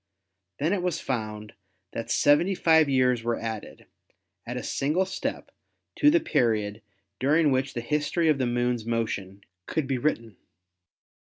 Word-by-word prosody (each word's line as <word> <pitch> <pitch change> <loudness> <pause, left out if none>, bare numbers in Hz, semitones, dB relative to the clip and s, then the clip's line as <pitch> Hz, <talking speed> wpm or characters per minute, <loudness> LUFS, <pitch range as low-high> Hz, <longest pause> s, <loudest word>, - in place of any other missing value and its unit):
Then 160 +6 0
it 195 - 0
was 175 -2 -1
found 110 -4 -4 0.4
that 115 - -5
seventy 165 +7 +3
five 160 -4 +4
years 125 -3 +2
were 115 0 -1
added, 110 -2 -6 0.6
at - - -4
a - - -4
single 155 +7 0
step, 190 - -5 0.5
to 295 - +6
the 340 +3 +4
period 110 - 0 0.4
during 150 +3 +3
which 130 +1 0
the 120 - -2
history 150 +6 0
of 150 -3 +3
the 130 - +1
Moon's 120 -1 0
motion 110 -4 -3 0.3
could 160 -3 -1
be 135 -1 -1
written. 115 -7 -2
130 Hz, 145 wpm, -26 LUFS, 115-155 Hz, 0.6 s, to